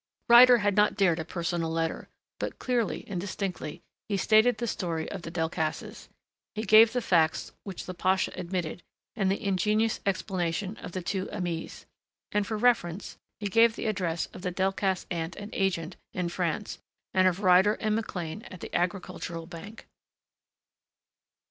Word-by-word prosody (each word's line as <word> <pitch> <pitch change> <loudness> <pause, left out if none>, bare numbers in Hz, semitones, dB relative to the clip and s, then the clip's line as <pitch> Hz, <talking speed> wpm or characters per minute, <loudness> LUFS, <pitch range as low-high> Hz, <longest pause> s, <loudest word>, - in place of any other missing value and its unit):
Ryder 245 +1 +9
had 205 -3 +1
not 210 0 +4
dared 180 -4 +3
a - - -2
personal 170 -1 -2
letter. 165 0 -2 0.3
But - - -4
clearly, 240 -6 -1
and 185 -4 -3
distinctly, 185 -5 -4 0.3
he 200 - +1
stated 220 +4 +4
the 240 - -2
story 170 -7 -2
of 195 - -5
the 165 - -7
Delcassés. 160 -1 -3 0.5
He 215 - -2
gave 220 +2 +7
the 245 0 -1
facts 165 -6 +2
which 195 -3 -6
the 185 - -5
pasha 185 +1 +1
admitted 180 -1 -4 0.3
and 195 -3 +1
the 195 - 0
ingenious 210 +3 +1
explanation 185 0 -1
of - - -9
the 185 - -4
two 190 +1 -2
Aimées. 170 -3 -5 0.5
And 205 -1 0
for 220 - -2
reference 210 -6 +1 0.2
he 210 - -5
gave 225 +3 +4
the - - -5
address 180 -6 -1
of - - -9
the 180 - -2
Delcassé 190 0 0
aunt 165 0 -3
and 205 +1 -8
agent 180 -3 -1 0.2
in 180 -2 -1
France 175 +3 -2 0.3
and 185 0 +5
of 185 +2 0
Ryder 190 +2 +5
and 215 -1 0
McLean 190 -4 -4
at 185 - -10
the - - -8
Agricultural 175 -2 -2
Bank. 185 +6 -10
190 Hz, 160 wpm, -28 LUFS, 175-210 Hz, 0.5 s, Ryder